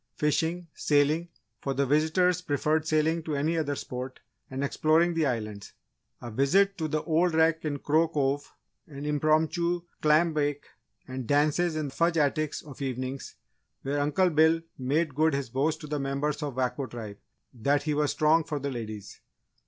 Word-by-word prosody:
Fishing, 165 +3 0
sailing 150 +4 +2 0.3
for 135 -1 -3
the 140 +1 +2
visitors 160 +5 +2
preferred 155 -1 0
sailing 160 +1 +2
to 155 -2 -3
any 155 +4 0
other 145 -3 -1
sport 130 0 -6 0.3
and 135 +1 -3
exploring 160 +4 +2
the 165 -3 +1
islands; 105 -5 -4 0.5
a 120 - -6
visit 190 - +3
to 160 - -1
the 155 0 -1
old 170 +1 +2
wreck 160 0 +3
in 145 -2 -1
Crow 155 +4 +2
Cove, 145 -2 -1 0.4
an 145 -1 -8
impromptu 160 +4 +1 0.2
clam 155 +2 +4
bake, 145 -1 -1 0.4
and 130 -2 -5
dances 155 +4 +2
in 150 -3 -2
Fudge 170 +3 +1
Attic 150 0 +1
of 145 -2 -11
evenings 130 0 -4 0.5
where 140 +2 -1
Uncle 150 +6 +2
Bill 160 +1 +4
made 145 +4 0
good 155 +1 +2
his 135 -4 -3
boast 150 +5 0
to 150 - -7
the 150 0 -2
members 140 +2 -2
of 145 -4 -4
Wako 130 +1 -1
Tribe 110 -5 -8 0.4
that 140 +4 +1
he 150 0 0
was 150 0 +1
strong 155 +2 +3
for 150 0 -4
the 140 0 -3
ladies! 110 -5 -7
150 Hz, 170 wpm, -28 LUFS, 140-160 Hz, 0.5 s, clam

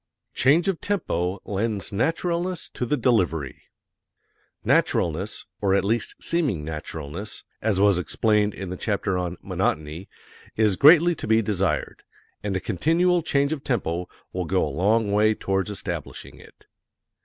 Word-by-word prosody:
Change 150 +8 +3
of 190 -4 -1
Tempo 95 - -1
Lends 105 0 -2
Naturalness 170 - -1
to 125 - -4
the 150 - +1
Delivery 90 - 0 1.0
Naturalness, 90 +6 +1 0.2
or 100 -2 +3
at 100 - +1
least 115 +2 -1
seeming 135 - -1
naturalness, 80 +5 -6 0.2
as 105 -3 +1
was 100 -2 +4
explained 105 +2 +1
in 95 -2 -6
the 90 - -4
chapter 100 -3 -1
on 90 0 -3
"Monotony," 80 +5 -2 0.5
is 105 -3 +3
greatly 165 - +7
to - - -7
be 110 +1 +3
desired, 95 -6 -1 0.4
and 100 -2 -2
a - - +1
continual 170 - +2
change 140 -1 +1
of 145 -3 -6
tempo 90 -8 -2 0.2
will 90 -1 -2
go 95 -1 +1
a - - -3
long 105 +6 +2
way 105 +1 +3
towards 95 0 -1
establishing 85 -6 -6
it. - - -18
105 Hz, 145 wpm, -24 LUFS, 90-130 Hz, 1.0 s, greatly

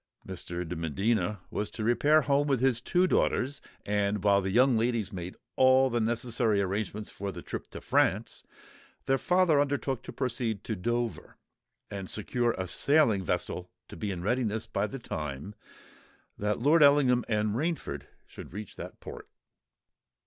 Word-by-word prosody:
Mr. 90 -2 -5
de 90 - -4
Medina 95 +5 0
was 105 - -2
to 110 - -6
repair 145 +7 +4
home 140 +1 +2
with 135 -3 +2
his 125 -2 +2
two 180 +7 +2
daughters: 140 -5 +1 0.2
and 105 -1 0
while 100 -1 +4
the 95 - -2
young 125 +5 +4
ladies 115 -3 0
made 90 0 -6 0.2
all 130 0 +5
the 120 - +1
necessary 115 -1 +1
arrangements 100 +2 -2
for 100 0 -5
the - - -9
trip - - -6
to - - -8
France, - - +1 0.6
their 135 0 +2
father 180 -5 +3
undertook 140 -3 0
to - - -9
proceed 120 -5 -2
to 110 - -3
Dover, 120 +4 -3 0.5
and 100 -2 -5
secure 120 +2 0
a 95 - -3
sailing 115 - +3
vessel 90 +1 -2 0.2
to - - -9
be 95 +5 -3
in 90 -3 -4
readiness 110 0 0
by 100 +2 -1
the 135 - -6
time 80 - -5 0.8
that 105 +1 -1
Lord 150 +6 +4
Ellingham 140 -4 +5
and 105 -1 0
Rainford 160 +4 -3 0.2
should - - -11
reach 105 0 -8
that - - -8
port. - - -9
110 Hz, 160 wpm, -29 LUFS, 100-130 Hz, 0.8 s, all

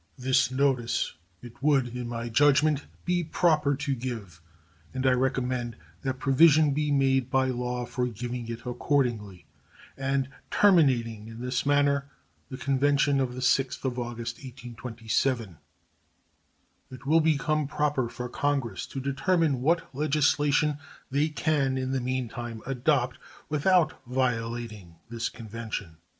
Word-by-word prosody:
This 130 0 +2
notice 130 -3 0 0.3
it 120 0 -12
would, 140 -4 +3
in 125 -1 -4
my 120 0 -4
judgment, 145 +4 +3 0.2
be 175 -1 +1
proper 155 -3 +2
to 140 0 -2
give, 115 -10 -6 0.5
and 130 0 -2
I 130 - +5
recommend 125 -2 0 0.3
that 130 +3 -2
provision 150 +3 +5
be 150 +1 0
made 135 -2 +2
by 130 0 +2
law 125 0 -2
for 125 +1 -2
giving 120 +1 -5
it 115 +1 -6
accordingly, 120 -7 -1 0.5
and 135 0 0 0.2
terminating 125 - +3
in 115 0 -9
this 125 +2 -2
manner 140 -1 +2 0.4
the 130 - -6
convention 140 +1 +2
of 125 -2 -1
the 130 - -5
6th 135 +1 +1
of 125 -1 -1
August, 120 0 -4
1827. 120 - -3 1.3
It 130 +1 -11
will 160 +3 +4
become 155 -1 +1
proper 145 -4 0
for 125 +1 -5
Congress 140 -2 -1
to 135 - -6
determine 140 +1 +1
what 165 0 +1
legislation 145 +1 +2 0.3
they 145 +3 +2
can 145 -3 0
in 130 0 -2
the 135 -1 0
meantime 120 -2 -4
adopt 130 -1 0 0.3
without 155 0 +2
violating 115 -7 -2 0.2
this 115 0 -2
convention. 110 -6 -6
130 Hz, 130 wpm, -27 LUFS, 120-145 Hz, 1.3 s, I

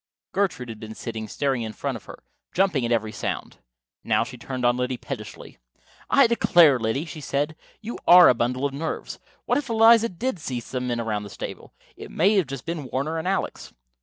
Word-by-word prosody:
Gertrude 185 -11 -1
had 110 -1 -8
been 110 0 -8
sitting 110 -2 -6
staring 135 +2 -1
in 110 -1 -5
front - - -3
of - - -10
her, - - -12 0.3
jumping 180 -8 +2
at - - -4
every 110 -2 +1
sound. - - -5 0.4
Now - - +2
she - - -9
turned 130 -2 -4
on 120 0 +4
Liddy 125 0 -2
pettishly. 115 -5 -8 0.5
"I 275 - +6
declare, 175 - +5
Liddy," 115 +7 -1
she 160 -2 -8
said, 145 +3 -1 0.3
"you 230 +2 -6
are 180 0 +10
a - - +6
bundle 125 +3 -1
of 140 - -1
nerves. 160 +3 -4 0.3
What - - +2
if 275 -3 -7
Eliza 230 0 +6
did 225 +2 -3
see 130 -5 -4
some 125 +1 -5
men 120 -1 -1
around 110 -3 -2
the 105 - -8
stable? - - -8 0.2
It - - -10
may 195 +6 +3
have 185 -7 +2 0.2
been 165 -4 -4
Warner 155 +5 -1
and 160 - -4
Alex." 195 +1 -2
140 Hz, 200 wpm, -24 LUFS, 120-180 Hz, 0.5 s, are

